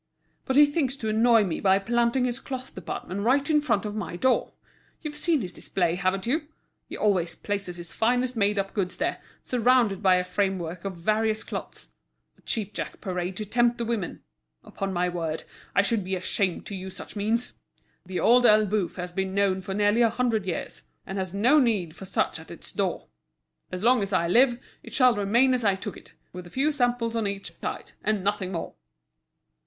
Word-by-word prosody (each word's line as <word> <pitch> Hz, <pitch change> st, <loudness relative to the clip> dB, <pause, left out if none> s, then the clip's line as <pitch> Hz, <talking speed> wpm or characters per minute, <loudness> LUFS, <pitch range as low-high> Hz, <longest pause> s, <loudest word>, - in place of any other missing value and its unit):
But 265 Hz, -, -1 dB
he 295 Hz, +1 st, +9 dB
thinks 290 Hz, -3 st, 0 dB
to 220 Hz, -4 st, -3 dB
annoy 225 Hz, +1 st, +5 dB
me 175 Hz, -5 st, -2 dB
by 190 Hz, -1 st, +4 dB
planting 235 Hz, +4 st, +1 dB
his 245 Hz, +1 st, -2 dB
cloth 260 Hz, -1 st, -6 dB
department 185 Hz, +2 st, -5 dB
right 265 Hz, +6 st, +2 dB
in 300 Hz, -1 st, +3 dB
front 225 Hz, -8 st, 0 dB
of 210 Hz, -, -3 dB
my 200 Hz, -5 st, -4 dB
door. 255 Hz, +8 st, +1 dB, 0.5 s
You've 300 Hz, -1 st, -4 dB
seen 310 Hz, -1 st, +1 dB
his 180 Hz, -3 st, -6 dB
display, 175 Hz, -1 st, -1 dB
haven't 185 Hz, +1 st, 0 dB
you? 295 Hz, +6 st, 0 dB, 0.4 s
He -, -, -6 dB
always 185 Hz, -5 st, +1 dB
places 200 Hz, -4 st, -4 dB
his 170 Hz, -1 st, -8 dB
finest 245 Hz, +2 st, +1 dB
made 205 Hz, -1 st, +2 dB
up 195 Hz, 0 st, -1 dB
goods 185 Hz, -3 st, -1 dB
there, -, -, -1 dB, 0.2 s
surrounded 240 Hz, -5 st, +3 dB
by 190 Hz, -3 st, +5 dB
a 180 Hz, -, +2 dB
framework 180 Hz, -2 st, -2 dB
of 190 Hz, -2 st, -4 dB
various 215 Hz, +4 st, +1 dB
cloths—a -, -, -10 dB
cheapjack 210 Hz, -2 st, -4 dB
parade 180 Hz, -1 st, -3 dB
to 215 Hz, -, -3 dB
tempt 240 Hz, +3 st, +2 dB
the 235 Hz, -, -2 dB
women. 225 Hz, -6 st, -3 dB, 0.4 s
Upon 195 Hz, 0 st, -4 dB
my 180 Hz, -1 st, +1 dB
word, 165 Hz, -3 st, -3 dB, 0.3 s
I 200 Hz, -, +5 dB
should 210 Hz, 0 st, +1 dB
be 190 Hz, +1 st, -2 dB
ashamed 185 Hz, 0 st, -1 dB
to 200 Hz, -, -6 dB
use 190 Hz, 0 st, -7 dB
such -, -, -10 dB
means! 220 Hz, +4 st, 0 dB, 0.5 s
The 185 Hz, 0 st, -4 dB
Old 245 Hz, +1 st, +5 dB
Elbeuf 210 Hz, -3 st, +3 dB
has 180 Hz, -1 st, -5 dB
been 190 Hz, +1 st, -2 dB
known 195 Hz, -2 st, +2 dB
for 190 Hz, +1 st, -5 dB
nearly 205 Hz, +3 st, +3 dB
a 230 Hz, -, +5 dB
hundred 230 Hz, -4 st, 0 dB
years, 175 Hz, -, -3 dB, 0.2 s
and 195 Hz, 0 st, -4 dB
has 185 Hz, -2 st, -3 dB
no 240 Hz, -, +4 dB
need 205 Hz, -, +1 dB
for 195 Hz, -, -9 dB
such 190 Hz, -, -1 dB
at -, -, -13 dB
its -, -, -10 dB
door. -, -, -2 dB, 0.7 s
As 185 Hz, +1 st, -5 dB
long 245 Hz, 0 st, +5 dB
as 200 Hz, 0 st, -3 dB
I 170 Hz, -2 st, +2 dB
live, 240 Hz, +6 st, +4 dB, 0.2 s
it -, -, -9 dB
shall 255 Hz, -2 st, +6 dB
remain 230 Hz, +6 st, +3 dB
as 250 Hz, -2 st, 0 dB
I 200 Hz, -3 st, +3 dB
took 195 Hz, 0 st, -6 dB
it, -, -, -15 dB, 0.2 s
with 180 Hz, 0 st, -8 dB
a -, -, -12 dB
few 275 Hz, -, +1 dB
samples 245 Hz, -4 st, 0 dB
on 225 Hz, -2 st, 0 dB
each 200 Hz, 0 st, -4 dB
side, -, -, -6 dB
and 210 Hz, -2 st, 0 dB
nothing 195 Hz, -2 st, -1 dB
more!" 165 Hz, -, -4 dB
205 Hz, 200 wpm, -26 LUFS, 185-240 Hz, 0.7 s, he